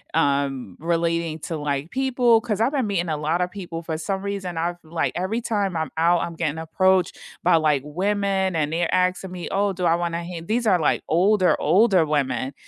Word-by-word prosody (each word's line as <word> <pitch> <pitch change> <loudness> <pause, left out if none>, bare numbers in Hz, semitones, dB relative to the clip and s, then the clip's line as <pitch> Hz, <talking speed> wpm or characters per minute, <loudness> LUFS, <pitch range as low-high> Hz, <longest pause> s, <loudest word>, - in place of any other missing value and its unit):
um, 140 - 0
relating 170 -1 -1
to, 165 - -4
like, 145 +1 -3
people, 250 -3 +3
'cause 220 -3 -2
I've 230 +4 +2
been 270 -6 0
meeting 175 -4 -1
a 155 - -1
lotta 170 +4 0
people 175 -4 -7
for 160 -1 -4
some 190 +4 -3
reason, 195 -4 -4
I've, 175 +2 -1
like, 160 +1 -2
every 190 +7 -2
time 205 -6 -1
I'm 160 -4 -3
out, 170 +2 +3
I'm 170 - -4
getting 160 -2 -2
approached 185 +3 +1 0.2
by, 180 - +5
like, 150 -4 +2
women 190 +3 0
and 155 -1 0
they're 170 0 0
asking 185 0 0
me, 180 -2 -6
"Oh, 200 +1 +1
do 180 -1 -3
I 165 - +4
want 170 0 -1
to - - -1
h" 170 -1 -7
these 235 +2 0
are 185 -5 +4
like 155 - +1
older, 185 0 +3
older 190 +2 +4
women. 140 -2 -1
175 Hz, 205 wpm, -23 LUFS, 160-195 Hz, 0.2 s, by